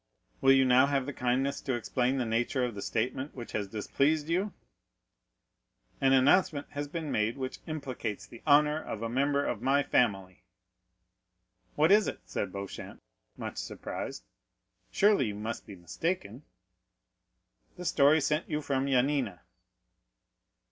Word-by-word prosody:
"Will 135 - +6
you 135 0 +5
now 130 +2 +5
have 140 -2 0
the 140 - -5
kindness 130 +3 0
to 130 -3 -1
explain 125 +3 0
the 125 - 0
nature 120 +3 0
of 120 - -4
the 100 - -7
statement 130 +7 -2
which 120 -3 -8
has 105 -2 -2
displeased 145 +9 0
you?" 190 +5 0 1.5
"An 135 - +4
announcement 145 +4 +4
has 145 0 -4
been 160 0 -4
made 110 +4 0
which 130 -1 -5
implicates 135 -9 -4
the 120 - -13
honor 150 +1 +4
of 110 -6 -6
a 115 - -2
member 140 +3 +1
of 115 - -2
my 140 +3 +3
family." 95 -9 0 1.3
"What 155 +4 +4
is 210 0 +6
it?" - - -5
said - - -3
Beauchamp, 100 -1 -7 0.4
much - - -6
surprised; - - -5 0.7
"surely 200 - +3
you 105 - -4
must 110 +2 -5
be 100 - -9
mistaken." 120 - -4 1.3
"The 180 - -7
story 150 0 +4
sent 150 +3 0
you 150 -2 -1
from 140 -2 -1
Yanina." 130 - +1
135 Hz, 145 wpm, -30 LUFS, 115-145 Hz, 1.5 s, Will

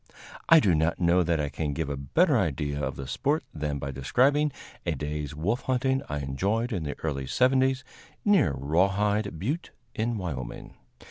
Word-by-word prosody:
I 165 - +9
do 100 - +3
not 80 +1 +1
know 90 0 +4
that 85 -2 +1
I 75 -1 -1
can 75 0 -3
give 80 0 -2
a 70 - -2
better 145 - +2
idea 75 - 0
of - - -2
the 70 - -6
sport 145 - 0
than 75 -2 -2
by 70 0 -4
describing 135 - +2 0.3
a - - -1
day's 75 -1 -4
wolf 100 +11 -1
hunting 130 +1 +1
I 75 - -2
enjoyed 100 - -1
in 90 - -1
the 70 - -4
early 70 -4 -2
seventies 130 - +2 0.4
near 195 - +4
Raw 80 +8 +3
Hide 105 -1 0
Butte, 140 - -3 0.2
in 115 +1 -1
Wyoming. 70 -10 -5
85 Hz, 180 wpm, -27 LUFS, -, 0.4 s, I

